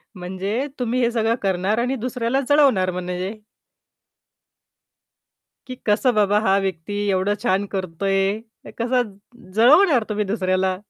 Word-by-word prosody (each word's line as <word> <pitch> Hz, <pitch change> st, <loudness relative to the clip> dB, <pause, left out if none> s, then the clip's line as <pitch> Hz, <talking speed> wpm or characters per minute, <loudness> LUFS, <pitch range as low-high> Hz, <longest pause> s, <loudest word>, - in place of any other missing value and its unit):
म्हणजे 190 Hz, +8 st, -3 dB
तुम्ही 250 Hz, +1 st, 0 dB
हे 235 Hz, 0 st, +2 dB
सगळं 225 Hz, 0 st, +1 dB
करणार 190 Hz, +3 st, 0 dB
आणि 250 Hz, +3 st, 0 dB
दुसऱ्याला 250 Hz, +1 st, -1 dB
जळवणार 260 Hz, -11 st, +4 dB
म्हणजे 180 Hz, +2 st, -4 dB, 2.3 s
की 255 Hz, -, -6 dB
कसं 240 Hz, +4 st, +3 dB
बाबा 205 Hz, 0 st, +3 dB
हा 195 Hz, -2 st, +2 dB
व्यक्ती 185 Hz, +1 st, -4 dB, 0.2 s
एवढं 195 Hz, +2 st, +1 dB
छान 195 Hz, -2 st, +1 dB
करतोय? 195 Hz, +3 st, -1 dB, 0.3 s
क -, -, -9 dB
कसं 240 Hz, -3 st, 0 dB, 0.4 s
जळवणार 270 Hz, -, +5 dB
तुम्ही 210 Hz, 0 st, -1 dB
दुसऱ्याला. 185 Hz, -2 st, 0 dB
205 Hz, 120 wpm, -22 LUFS, 190-240 Hz, 2.3 s, जळवणार